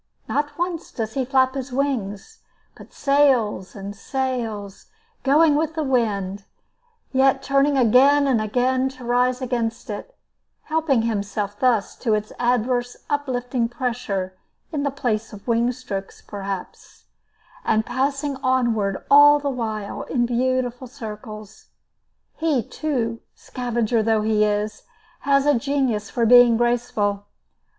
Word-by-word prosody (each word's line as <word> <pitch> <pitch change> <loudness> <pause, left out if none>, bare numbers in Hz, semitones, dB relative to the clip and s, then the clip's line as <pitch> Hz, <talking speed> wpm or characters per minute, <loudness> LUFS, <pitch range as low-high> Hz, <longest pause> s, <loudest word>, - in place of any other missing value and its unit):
Not 290 +3 -2
once 345 -1 -3
does 220 -3 -4
he 265 -2 -1
flap 260 0 +2
his 265 -1 -5
wings, 260 - -3 0.4
but - - -14
sails 260 -10 +2
and 200 0 -7
sails, 225 -5 -4 0.3
going 295 +3 +4
with 315 +1 -1
the 315 - -1
wind, 205 -7 -1 0.7
yet 270 0 +3
turning 275 +1 +2
again 270 +4 +5
and 255 -5 +2
again 255 +4 +1
to 250 - -10
rise 250 +2 +1
against 235 -3 -2
it, - - -8 0.5
helping 310 -7 +1
himself 205 -2 -3
thus 240 -6 +1
to 225 -4 +1
its 210 0 -4
adverse, 245 0 0
uplifting 250 -4 -1
pressure 230 -7 -3 0.4
in 300 -3 -2
the 280 - 0
place 235 -6 -2
of 205 +2 -12
wing 235 +1 +2
strokes, 205 -6 -6
perhaps, 195 -2 -7 0.6
and 220 0 +1
passing 275 +2 -1
onward 235 -7 0
all 290 +1 +8
the 285 -1 -2
while 220 -5 -4
in 240 -3 0
beautiful 250 +1 -1
circles. 215 -4 -9 0.7
He, 310 -7 +1
too, 235 -7 -2 0.2
scavenger 240 -2 -1
though 220 -1 +1
he 215 -1 +2
is, 210 0 -2 0.4
has 275 -1 +2
a 295 - +5
genius 245 -5 0
for 235 - 0
being 240 0 +7
graceful. 235 -4 0
245 Hz, 130 wpm, -22 LUFS, 215-270 Hz, 0.7 s, all